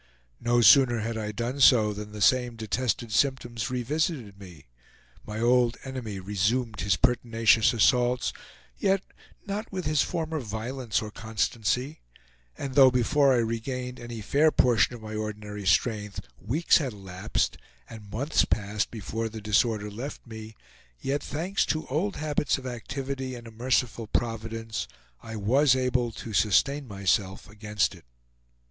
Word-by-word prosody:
No 120 0 +2
sooner 120 +1 +6
had 115 +1 -3
I 105 -1 -3
done 120 +5 -3
so 110 -5 +6
than 105 +1 -7
the 105 -1 -2
same 125 0 +3
detested 115 +1 -2
symptoms 120 -1 0
revisited 125 - -2
me; 90 -7 -13 0.6
my 105 0 -5
old 120 0 +3
enemy 125 -7 -5
resumed 105 +4 -1
his 100 -1 +2
pertinacious 115 -3 +3
assaults, 125 +2 +2 0.5
yet 195 0 +2 0.4
not 210 +2 -4
with 185 -2 -4
his 155 -1 +2
former 160 -3 -2
violence 115 0 -3
or 105 - -7
constancy, 115 +6 -2 0.6
and 135 -2 -5
though 135 -1 +8
before 130 +3 +3
I - - +3
regained 125 +2 -4
any 120 -1 -7
fair 150 +9 +3
portion 120 -2 +3
of 115 - -12
my 110 0 -7
ordinary 105 -2 -5
strength 105 +2 +1 0.2
weeks 140 - +3
had 135 -6 -3
elapsed, 95 0 -2 0.3
and 110 -3 -11
months 140 +9 +1
passed 105 0 -1
before 115 +1 -4
the 110 0 -8
disorder 105 0 +1
left 125 +8 -7
me, 110 -1 -9 0.4
yet 140 +2 -1
thanks 175 +8 -1
to 155 - -1
old 175 +9 -1
habits 150 -1 0
of 135 - -10
activity, 130 +2 -5
and 120 -1 -10
a 115 - -10
merciful 120 -1 -1
Providence, 115 0 -3 0.3
I 110 -1 -8
was 130 +6 +3
able 125 -2 0
to 110 - -8
sustain 140 +8 +2
myself 95 -1 -1
against 105 0 -1
it. - - -16
120 Hz, 145 wpm, -27 LUFS, 105-130 Hz, 0.6 s, though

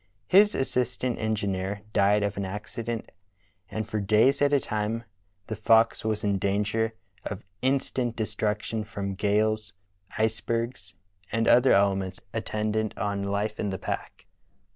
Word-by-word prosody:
His 205 - +6
assistant 125 -1 -1
engineer 100 -2 -1
died 105 +1 +4
of 100 0 -1
an 100 - -3
acci 105 +4 -5
dent, 115 0 -4 0.6
and 110 -1 -3
for 110 - -2
days 110 +8 +3
at 145 0 +4
a 145 - +5
time 110 0 -2 0.4
the 110 - -4
Fox 115 +2 +4
was 110 0 -1
in 100 -2 +1
danger 105 +3 0 0.3
of 100 -1 -6 0.2
instant 130 -2 0
destruction 110 0 -2
from 100 -2 -4
gales, 105 +2 +1 0.4
icebergs, 110 -3 -1 0.4
and 115 0 +1
other 125 +2 +6
elements 95 -2 +2
attendant 110 -1 -1
on 100 -1 -1
life 100 +2 -2
in 105 - -1
the 95 - -3
pack. - - -5
110 Hz, 140 wpm, -27 LUFS, 100-115 Hz, 0.6 s, His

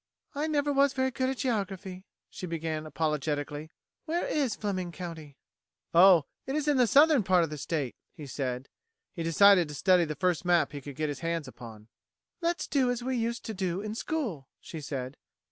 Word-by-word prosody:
"I 295 +1 -1
never 290 -2 +1
was 275 0 +4
very 260 0 0
good 260 +1 -1
at 265 - -3
geography," 195 -6 -3 0.2
she 185 - -7
began 160 -2 -3
apologetically. 150 0 -2 0.4
"Where 335 +2 -1
is 270 -7 0
Fleming 185 -4 -3
County?" 160 -4 -8 0.6
"Oh, 175 -1 +7 0.2
it 270 - -2
is 305 -1 -1
in 295 -2 +3
the 250 -2 +4
southern 290 +1 +6
part 185 -3 +3
of 160 - -3
the 150 - -5
state," 145 -5 -2 0.2
he 150 - -10
said. 130 -1 -4 0.5
He 170 - -6
decided 180 +2 +5
to 150 - -8
study 180 +3 +4
the 150 -1 -4
first 180 +2 0
map 175 -2 +3
he 145 -1 -7
could 140 0 -9
get 155 +1 -1
his 145 - -4
hands 165 -3 -2
upon. 110 -4 -11 0.5
"Let's 340 0 0
do 265 -3 +1
as 245 -1 -2
we 260 +1 -1
used 235 0 -2
to 220 - -4
do 185 -1 -2
in 215 0 -4
school," 225 - -3
she 160 - -8
said. 135 -2 -5
180 Hz, 195 wpm, -29 LUFS, 150-245 Hz, 0.6 s, Oh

